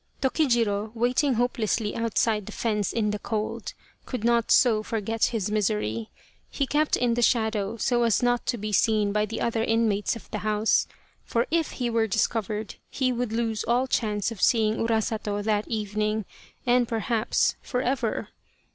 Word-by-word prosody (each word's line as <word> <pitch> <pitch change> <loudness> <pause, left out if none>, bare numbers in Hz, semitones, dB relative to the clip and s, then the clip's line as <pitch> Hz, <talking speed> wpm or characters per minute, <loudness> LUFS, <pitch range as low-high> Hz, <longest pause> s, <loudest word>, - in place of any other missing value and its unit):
Tokijiro, 235 -7 +1
waiting 250 +3 +2
hopelessly 225 -2 0
outside 225 -2 0
the - - -6
fence 210 -4 -1
in 215 -2 0
the 210 - -3
cold, 215 0 -4 0.3
could 250 -5 -4
not 235 -1 +2
so 225 -4 +5
forget 225 0 -1
his 210 -4 -2
misery. 205 - -1 0.4
He 280 - -1
kept 300 +3 +1
in 245 -1 +1
the 240 - 0
shadow 220 -3 +1
so 240 +2 +1
as 230 0 +2
not 245 0 +2
to 240 - 0
be 215 0 -4
seen 210 0 +2
by 210 +1 +1
the 225 - -5
other 230 -1 0
inmates 225 -3 +1
of 230 - -11
the 210 - -3
house, 215 +1 +2 0.4
for 235 +1 0
if 330 -1 0
he 245 - -2
were 230 -1 +1
discovered 215 0 -1
he 260 -2 0
would 245 -2 -2
lose 225 -1 -1
all 245 +3 +2
chance 215 -4 -1
of 220 - -8
seeing 220 -2 +3
Urasato 220 -2 -1
that 210 0 0
evening 215 0 -1 0.4
and, 245 -1 +3
perhaps, 225 0 0
for 250 -1 -2
ever. 265 +2 -1
225 Hz, 165 wpm, -26 LUFS, 210-240 Hz, 0.4 s, so